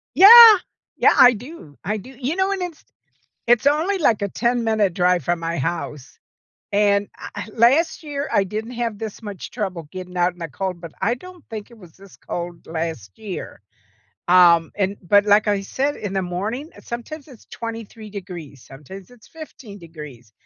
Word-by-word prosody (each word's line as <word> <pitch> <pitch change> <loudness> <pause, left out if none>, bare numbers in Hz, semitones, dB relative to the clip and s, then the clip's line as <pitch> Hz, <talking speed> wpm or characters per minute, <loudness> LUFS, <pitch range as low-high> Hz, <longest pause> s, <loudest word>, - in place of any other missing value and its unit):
Yeah. 450 +3 +11 0.4
Yeah, - - +5
I 245 0 +7
do, 235 - -11
I 210 +3 -2
do. 230 +6 -11
You 275 +6 -2
know, 385 +1 +1
and 390 -2 -2
it's 345 -3 -6 0.6
it's 240 +3 +3
only, 320 +7 +2
like, 225 - +2
a 200 - 0
10 240 +3 -1
minute 215 -5 +1
drive 180 -2 +2
from 175 0 0
my 165 -1 -3
house. 150 -2 -5 0.5
And 200 0 +2 0.3
eh - - -5
last 270 +10 +3
year, 290 -1 -4
I 200 - +3
didn't 220 +5 -5
have 230 -3 -3
this 220 0 -7
much 205 -4 -8
trouble 185 -5 -4
getting 185 -1 -9
out 175 0 +2
in 180 - -21
the 165 - -4
cold, 185 +3 -4
but 170 -2 -10
I 235 - +1
don't 365 +5 -14
think 215 -1 -7
it 235 - -15
was 180 -6 -16
this 195 -1 -16
cold 175 0 -7
last 160 - -5
year. 200 - -8 0.7
Um 175 -2 +5
and 200 0 -1
but 205 +3 +3
like 210 +1 +4
I 205 -1 +1
said, 275 +8 -2
in 205 -2 -5
the 195 - 0
morning, 210 - -4
sometimes 265 +6 -8
it's 255 -6 -16
23 225 -1 -8
degrees, 175 - -9
sometimes 180 - -12
it's 240 -3 -19
15 275 -10 -12
degrees. 150 - -12
205 Hz, 180 wpm, -21 LUFS, 175-245 Hz, 0.7 s, Yeah